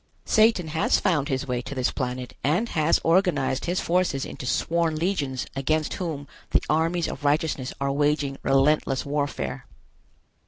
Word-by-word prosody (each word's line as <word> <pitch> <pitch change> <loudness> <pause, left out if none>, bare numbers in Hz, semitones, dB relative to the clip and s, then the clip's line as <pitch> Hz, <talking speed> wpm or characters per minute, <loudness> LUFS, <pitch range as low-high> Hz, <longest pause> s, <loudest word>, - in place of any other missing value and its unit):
Satan 215 -7 +3
has 160 +1 +2
found 150 -6 +1
his 135 0 -2
way 125 -1 -1
to 140 - -7
this 130 -1 0
planet 125 -1 -4
and 175 +11 +1
has 155 0 +2
organized 165 -7 +2
his 175 +2 0
forces 175 -6 0
into 125 - -7
sworn 165 +3 +1
legions 155 -6 -1
against 155 +3 0
whom 155 -6 -4 0.2
the - - +2
armies 165 +3 +1
of 140 - -6
righteousness 145 -3 0
are 140 0 0
waging 145 -1 0
relentless 135 0 +2
warfare. 140 - -3
150 Hz, 150 wpm, -25 LUFS, 135-165 Hz, 0.2 s, Satan